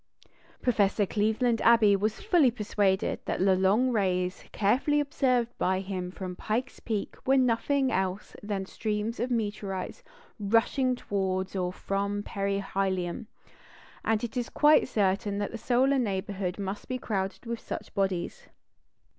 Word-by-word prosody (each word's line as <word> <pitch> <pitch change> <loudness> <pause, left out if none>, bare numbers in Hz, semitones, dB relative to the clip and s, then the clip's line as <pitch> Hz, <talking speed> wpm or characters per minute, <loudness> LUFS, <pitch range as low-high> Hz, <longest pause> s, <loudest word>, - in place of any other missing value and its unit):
Professor 210 -4 +2
Cleveland 220 +3 +1
Abbe 225 -3 +6
was 215 - -1
fully 350 - +4
persuaded 205 -4 0
that - - -2
the 190 0 +4
long 205 +7 +3
rays 185 -4 0
carefully 255 +8 +2
observed 255 -5 +1
by 185 0 +1
him 190 -2 -4
from 185 -1 -6
Pike's 235 +7 -3
Peak 215 -3 -3
were 270 +1 +3
nothing 260 +2 +2
else 190 +1 -2
than 205 -2 -3
streams 215 +3 -3
of 245 - -1
meteorites 205 -5 -3 0.4
rushing 230 +5 +2
towards 190 -4 -2
or 180 -1 -1
from 200 +2 -2
perihelion; 195 -2 -2 0.8
and 220 0 +1
it 235 0 -4
is 245 -1 -2
quite 300 +1 +5
certain 200 -2 0
that 205 0 -2
the 230 - -5
solar 265 +4 +2
neighbourhood 195 -4 -2
must 200 0 -5
be 255 - -2
crowded 195 -4 -3
with 235 0 -3
such - - -7
bodies. 195 - -2
205 Hz, 140 wpm, -28 LUFS, 195-240 Hz, 0.8 s, Abbe